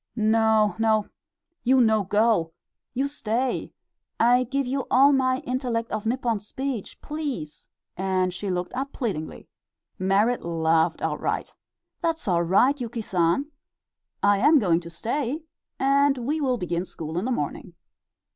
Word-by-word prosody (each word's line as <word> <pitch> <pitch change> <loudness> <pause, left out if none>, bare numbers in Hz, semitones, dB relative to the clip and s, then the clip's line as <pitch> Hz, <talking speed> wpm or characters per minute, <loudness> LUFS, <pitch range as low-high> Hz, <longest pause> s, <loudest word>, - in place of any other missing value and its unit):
"No, 220 -1 +3
no, 220 -2 +2 0.5
you 260 +2 +4
no 220 -3 +4
go! 205 -4 +2 0.4
You 270 +3 +1
stay. 255 -2 -2 0.5
I 245 +2 +4
give 275 +2 -1
you 265 +2 -2
all 275 +3 +6
my 260 -1 +1
intellect 245 -3 -2
of 215 0 -3
Nippon 235 -2 0
speech. 245 +2 -5
Please!" 285 - -5 0.3
and 185 -1 0
she 200 +2 -4
looked 180 -1 -2
up 270 +2 -4
pleadingly. 190 - -4 0.5
Merrit 200 +6 +2
laughed 165 0 +1
outright. - - -2 0.5
"That's 330 -5 -2
all 175 -3 +2
right, 245 +11 +3
Yuki 235 -1 -4
San; 185 - 0 0.7
I 200 0 +4
am 295 +6 +6
going 175 -9 +3
to 170 -1 -10
stay, 255 - -3 0.3
and 275 +1 +3
we 285 +6 -2
will 255 -3 +1
begin 175 -3 -2
school 160 -3 -7
in 195 - -3
the 260 - -1
morning." 240 - -4
230 Hz, 140 wpm, -25 LUFS, 190-265 Hz, 0.7 s, all